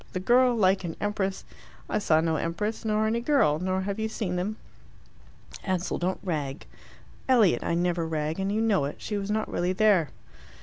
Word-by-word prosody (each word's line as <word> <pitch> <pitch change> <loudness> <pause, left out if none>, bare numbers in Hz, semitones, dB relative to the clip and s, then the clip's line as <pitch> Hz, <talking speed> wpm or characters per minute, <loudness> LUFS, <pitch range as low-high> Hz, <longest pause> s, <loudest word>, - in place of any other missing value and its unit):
The 185 - -2
girl 245 +5 +4
like 190 -3 +3
an 165 -2 -4
empress 200 -2 -2 0.2
" - - -23
"I - - 0
saw 160 -6 +3
no 160 -1 0
empress, 210 +10 -3
nor 215 -1 +1
any 230 +2 0
girl, 235 - +3
nor 185 +1 -1
have 200 +2 -3
you 220 0 -1
seen 195 -5 -3
them." 195 +5 -2 1.1
"Ansell, 185 -2 -1
don't 185 +2 -1
rag." 150 -6 -3 0.6
"Elliot, 230 -8 +4
I 170 - 0
never 175 -1 0
rag, 155 +1 -2
and 195 +1 -1
you 215 +2 0
know 210 -9 +2
it. 145 - -4
She 210 - -4
was 200 0 -3
not 215 +1 0
really 180 +1 0
there." 190 -7 +3
190 Hz, 190 wpm, -27 LUFS, 170-215 Hz, 1.1 s, girl